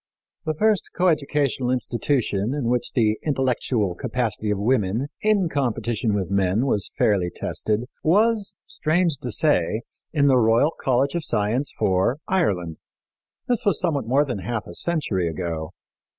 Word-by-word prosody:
The 155 0 -1
first 215 +2 +1
coeducational 145 -7 +1
institution 120 -2 0
in 130 -6 -1
which 125 0 0
the 110 -3 +2
intellectual 125 - 0
capacity 110 +2 -2
of 105 - +1
women, 110 +3 0
in 210 -4 +2
competition 120 -6 -1
with 95 -2 -2
men, 100 +4 +2
was 105 -7 0
fairly 95 -5 +2
tested 105 +4 -2 0.2
was, 210 +4 +2
strange 160 -2 0
to 125 - -3
say, 110 - +1 0.3
in 145 -3 +2
the 135 -2 +5
Royal 115 +6 +3
College 135 -2 0
of 170 -2 -2
Science 115 +4 0
for 95 +7 +1
Ireland. 90 - 0 0.7
This 245 -3 0
was 200 -6 +2
somewhat 140 -8 -1
more 140 +5 +3
than 125 -7 -3
half 110 +3 -3
a 85 - -10
century 105 - -1
ago. 80 -2 -4
125 Hz, 145 wpm, -23 LUFS, 105-150 Hz, 0.7 s, the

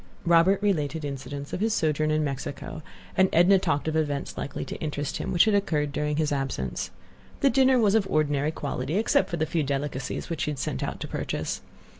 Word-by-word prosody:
Robert 170 +3 +5
related 160 -6 0
incidents 140 +1 -6
of - - -2
his 220 +1 +1
sojourn 155 -1 +1
in 155 0 +2
Mexico, 145 +2 -5 0.3
and 190 0 +4
Edna 180 +4 +6
talked 150 -5 0
of 160 - 0
events 145 -3 -1
likely - - -4
to - - -6
interest 145 -2 -2
him, - - -3
which 175 - +5
had 215 - +2
occurred 155 -8 +1
during 150 +1 -1
his 155 -1 0
absence. 135 - -2 0.5
The 275 - +5
dinner 260 +1 +5
was 210 -4 +4
of 205 -3 +2
ordinary 145 -1 +1
quality, 145 +1 -3
except 210 -3 +2
for 170 - -2
the 160 - +1
few 160 +1 0
delicacies 140 -1 -3
which 165 - -3
she - - 0
had 150 - -3
sent - - -3
out - - -3
to - - -3
purchase. - - -3
155 Hz, 205 wpm, -26 LUFS, 145-185 Hz, 0.5 s, Edna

